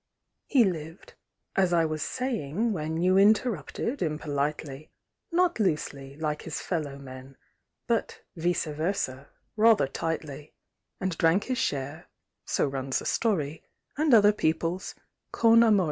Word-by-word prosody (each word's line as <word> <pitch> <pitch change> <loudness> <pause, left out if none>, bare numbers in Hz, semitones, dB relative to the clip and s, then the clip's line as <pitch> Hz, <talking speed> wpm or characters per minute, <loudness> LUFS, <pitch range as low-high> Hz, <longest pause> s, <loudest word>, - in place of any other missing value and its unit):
He 265 -4 +5
lived 165 -4 -4 0.4
as 190 -2 +3
I 165 -1 +4
was 155 -1 -3
saying, 230 - -1
when 160 -2 -3
You 185 +3 +3
interrupted, 220 - +1
impolitely 150 -2 -3 0.4
Not 350 -4 +2
loosely, 145 -7 -2
like 150 -1 -2
his - - -5
fellow 150 -6 -3
men, 130 0 -11 0.5
But, - - -1
vic├¬ 165 -2 -1
vers├ó, 145 -5 -2 0.3
rather 220 -5 +5
tightly; 155 0 -5 0.4
And 185 -2 -2
drank 165 +5 +3
his 255 -2 -2
share, 145 +1 -3 0.4
so - - +1
runs 135 -1 -2
the - - -5
story, 165 -10 0 0.3
And 305 0 +1
other 210 -3 +7
people's, 165 0 -1 0.4
con 230 0 +5
amore. 215 -3 +5
165 Hz, 130 wpm, -27 LUFS, 150-210 Hz, 0.5 s, other